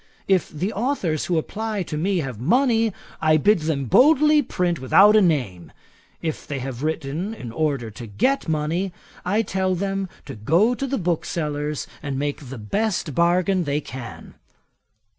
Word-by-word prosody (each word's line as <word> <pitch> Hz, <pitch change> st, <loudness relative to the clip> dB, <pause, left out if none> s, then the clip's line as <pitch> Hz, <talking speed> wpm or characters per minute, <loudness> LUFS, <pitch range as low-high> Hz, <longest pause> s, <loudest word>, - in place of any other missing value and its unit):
If 190 Hz, -3 st, +2 dB
the 180 Hz, +8 st, -3 dB
authours 200 Hz, -, -1 dB
who 175 Hz, -, 0 dB
apply 210 Hz, +4 st, -2 dB
to 160 Hz, -, -6 dB
me 180 Hz, +3 st, 0 dB
have 125 Hz, -7 st, -6 dB
money, 225 Hz, -, +2 dB, 0.3 s
I 155 Hz, 0 st, +4 dB
bid 205 Hz, +5 st, +3 dB
them 155 Hz, -3 st, -1 dB
boldly 300 Hz, -, +5 dB
print 180 Hz, -, -1 dB
without 195 Hz, +11 st, +6 dB
a 215 Hz, -, +6 dB
name; 125 Hz, -, 0 dB, 0.5 s
if 160 Hz, -2 st, -4 dB
they 140 Hz, -, -3 dB
have 130 Hz, -1 st, -5 dB
written 160 Hz, +6 st, -3 dB
in 120 Hz, -, -8 dB
order 135 Hz, -4 st, -1 dB
to 115 Hz, +2 st, -9 dB
get 260 Hz, -, 0 dB
money, 160 Hz, +5 st, -1 dB, 0.3 s
I 205 Hz, +5 st, +1 dB
tell 190 Hz, -2 st, 0 dB
them 195 Hz, +1 st, -2 dB, 0.2 s
to 140 Hz, -, -7 dB
go 165 Hz, -, +2 dB
to 275 Hz, +2 st, -3 dB
the 270 Hz, +1 st, -1 dB
booksellers, 150 Hz, -4 st, -2 dB, 0.2 s
and 140 Hz, -2 st, -4 dB
make 145 Hz, -1 st, -3 dB
the 135 Hz, -, -7 dB
best 175 Hz, -, -1 dB
bargain 175 Hz, +3 st, +2 dB
they 145 Hz, +1 st, 0 dB
can.' 130 Hz, -5 st, -9 dB
165 Hz, 160 wpm, -23 LUFS, 140-200 Hz, 0.5 s, without